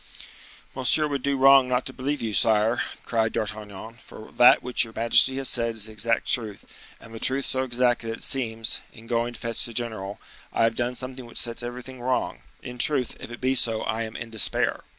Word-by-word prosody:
"Monsieur 135 +4 +2
would 140 -2 -3
do 140 0 0
wrong 135 -1 +7
not 125 0 0
to 130 - -5
believe 140 +1 -3
you, 110 -2 -2
sire," 110 +4 +3 0.2
cried 115 -1 0
D'Artagnan: 105 +1 -5
"for 110 - -12
that 120 +1 +6
which 125 0 +1
your 115 -1 -9
majesty 115 +3 +4
has 135 -1 -1
said 115 -1 +1
is 110 -2 0
the 110 - -8
exact 115 +2 +1
truth, 110 -5 -3 0.3
and 115 - -14
the 115 - -7
truth 135 +3 -1
so 130 - -1
exact 125 -1 +1
that 115 -1 -4
it 115 - -8
seems, 115 -4 -1
in 115 - -14
going 120 0 -1
to - - -10
fetch 115 -1 -2
the 115 - -5
general, 110 -4 -4 0.3
I - - +1
have 115 0 +3
done 120 +2 -2
something 130 -1 -7
which - - -8
sets 115 -1 0
everything 125 +1 -8
wrong. 130 +1 -1 0.2
In 125 0 -8
truth, 135 -4 +2
if - - -9
it 120 - -9
be 130 +1 +1
so, 115 -3 +2
I 110 +3 -2
am 110 -1 -5
in 115 -1 -7
despair." 110 -2 +1
120 Hz, 215 wpm, -25 LUFS, 115-130 Hz, 0.3 s, wrong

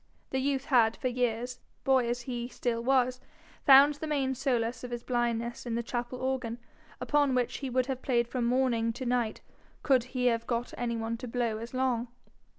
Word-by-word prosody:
The 265 - 0
youth 275 0 0
had 235 -6 +3
for 255 - -1
years, 245 0 -1 0.2
boy 260 -3 +3
as 245 +1 -2
he 240 -1 -4
still 235 -2 -2
was, 255 -1 +2 0.5
found 280 +2 +9
the 295 +2 -6
main 275 -3 0
solace 245 -3 -1
of 250 - -5
his 240 -1 -5
blindness 240 -1 -1
in 230 - -1
the 235 - -1
chapel 240 +1 -4
organ, 255 -3 -2 0.4
upon 290 -3 +2
which 250 -1 0
he 270 - -4
would 255 0 +1
have 260 -1 -4
played 240 -3 +1
from 245 -1 -2
morning 235 -2 +1
to 255 +3 -6
night 240 -3 0 0.4
could 260 -4 +3
he 255 -1 -2
have 230 -1 +1
got 235 0 -2
any 235 -1 -2
one 225 +1 -3
to 250 +2 -7
blow 230 -2 -1
as 235 +3 -7
long. 250 -2 0
245 Hz, 195 wpm, -30 LUFS, 235-260 Hz, 0.5 s, found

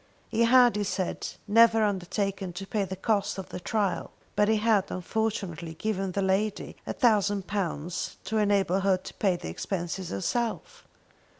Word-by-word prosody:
He 230 +1 +3
had, 245 -2 +6
he 205 - 0
said, 190 -2 -2 0.2
never 225 +1 +6
undertaken 195 -1 -1
to 195 +3 -6
pay 200 0 -1
the 190 - -5
cost 200 +1 0
of 190 - -6
the - - -6
trial, 200 -1 -1 0.3
but 210 - +3
he 220 - +4
had, 210 -3 +2
unfortunately, 185 -4 -3
given 195 -1 -2
the 200 - 0
lady 195 +2 0
a - - -2
thousand 205 -5 +2
pounds 180 -4 -3
to 220 +2 -2
enable 200 -3 +2
her 195 -1 +3
to - - -10
pay 195 -4 +1
the 175 - -6
expenses 175 - -4
herself. 230 - -3
200 Hz, 165 wpm, -28 LUFS, 185-215 Hz, 0.3 s, had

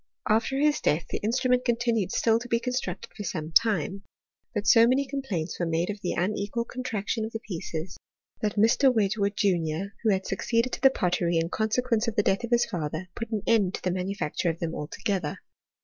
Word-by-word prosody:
After 225 +5 +2
his 295 +1 +2
death 155 +3 +1
the - - -1
instrument 250 +3 +1
continued 235 -5 +1
still 225 0 +3
to 245 - -8
be 230 -1 +1
constructed 250 -7 -3
for 210 - -6
some 155 -3 -4
titne; 200 -2 +2 0.5
but 210 -3 -3
so 230 +2 +7
many 265 +3 +2
complaints 255 - -3
were 175 - 0
made 165 +4 0
of 205 -1 -9
the 180 - -1
unequal 205 +5 -1
contraction 230 -3 -3
of 220 - -5
the 225 - -3
pieces, 170 -3 -5 0.4
that 210 -1 -1
Mr. 235 +6 +4
Wedge 215 -2 +1
wood, 200 -1 +1
junior, 180 -1 0
who 225 - +2
had 190 -2 +1
succeeded 230 +2 0
to - - -3
the 270 - +8
pottery 175 -7 0
in 165 0 0
con 220 +3 -1
sequence 240 -1 +1
of 225 - -2
the 205 - +3
death 195 +4 +1
of 235 - -3
his 240 -1 +3
father, 165 +2 -4
put 230 -1 -5
an 215 -3 -2
end 205 -5 +3
to - - -9
the 185 - +1
ihanufacture 180 -2 -2
of 165 - -2
them 165 -1 -3
altogether. 165 +1 -3
210 Hz, 210 wpm, -27 LUFS, 180-235 Hz, 0.5 s, the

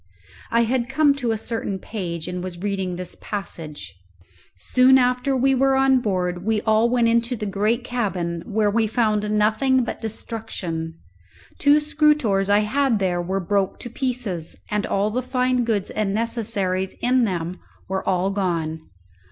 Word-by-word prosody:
I 230 0 +3
had 240 +1 0
come 290 +1 +4
to 245 -4 -2
a 225 - +1
certain 220 -3 -3
page 175 -5 -5
and 180 0 -4
was 185 -2 -6
reading 190 -3 -2
this 180 0 -2
passage: 155 - -6 0.7
"_Soon 255 - +5
after 250 +1 +1
we 270 +2 +3
were 270 +1 +3
on 265 -1 +4
board 180 -5 -1
we 220 +1 +1
all 220 +2 +3
went 240 -1 +3
into 235 +2 +1
the 215 - -4
great 210 +5 0
cabin, 190 -9 -2
where 210 -1 +1
we 225 +1 +2
found 215 -2 +1
nothing 220 +5 +2
but 235 - -5
destruction. 200 -7 -5 0.6
Two 290 +1 +5
scrutores 295 -10 +2
I 205 +1 +5
had 255 +2 +1
there 180 -3 0
were 190 +2 -2
broke 195 +1 0
to 240 - -6
pieces, 235 - -3 0.2
and 210 -1 0
all 205 +2 0
the 250 +4 -1
fine 255 -1 +1
goods 220 -4 -1
and 205 -2 -1
necessaries 205 -5 -1
in 250 0 +3
them 180 -2 -3 0.3
were 190 0 -2
all 190 +1 +1
gone. 165 -5 -1
215 Hz, 160 wpm, -23 LUFS, 190-245 Hz, 0.7 s, Soon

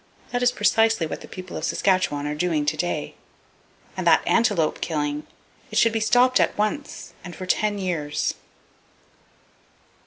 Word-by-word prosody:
That 245 - -1
is 245 0 +4
precisely 225 -3 +2
what 155 - -6
the - - -10
people 185 -1 -9
of - - -6
Saskatchewan 185 -7 +1
are 150 - -2
doing 155 -1 0
to 150 +1 +1
day. 175 +3 -3 0.8
And - - -2
that - - +5
antelope 205 -9 +2
killing! 150 -2 -2 0.4
It - - -4
should 230 -1 +4
be 225 - +1
stopped 250 +3 +4
at - - +1
once, 215 +8 -3
and 175 0 -8
for 185 - -7
ten 205 +3 +1
years. 165 -6 -2
185 Hz, 155 wpm, -24 LUFS, 155-225 Hz, 0.8 s, that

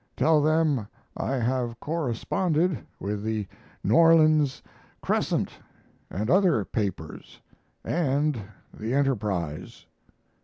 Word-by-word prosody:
Tell 155 -1 +4
them 155 -7 +2 0.3
I - - -2
have 120 -1 -1
corresponded 160 - 0 0.2
with 100 +1 -3
the 110 -2 -2 0.4
N. 100 - +1
Orleans 155 -1 +5 0.4
Crescent - - 0 0.6
and 105 +3 -3
other 170 - +3
papers 95 -8 -5 0.5
and 145 -5 0 0.3
the 115 +4 -3
Enterprise. 105 - -2
130 Hz, 90 wpm, -26 LUFS, 110-155 Hz, 0.6 s, Orleans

